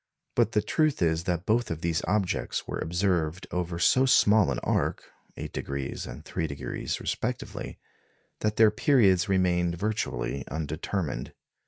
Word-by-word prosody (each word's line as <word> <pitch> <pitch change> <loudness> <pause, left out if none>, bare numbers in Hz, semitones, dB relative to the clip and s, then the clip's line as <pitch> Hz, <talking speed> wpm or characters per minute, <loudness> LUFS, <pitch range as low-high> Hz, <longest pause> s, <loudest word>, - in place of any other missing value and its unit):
But 110 - +2
the 105 - +2
truth 155 +6 +1
is 80 0 +1
that 90 0 -1
both 120 +3 +2
these 80 0 -1
objects 100 -2 -1
were - - -3
observed 85 -1 0
over 90 -1 -2
so 130 +9 +4
small 105 - +5
an 65 - -1
arc - - 0 0.3
8° 70 -1 -4
and - - -9
3° 70 -6 -3
respectively - - -4 0.6
that 105 0 0
their 110 -1 +6
periods 105 -7 +3
remained 90 -2 +2
virtually 95 - -2
undetermined. 80 -1 -3
90 Hz, 130 wpm, -27 LUFS, 80-105 Hz, 0.6 s, their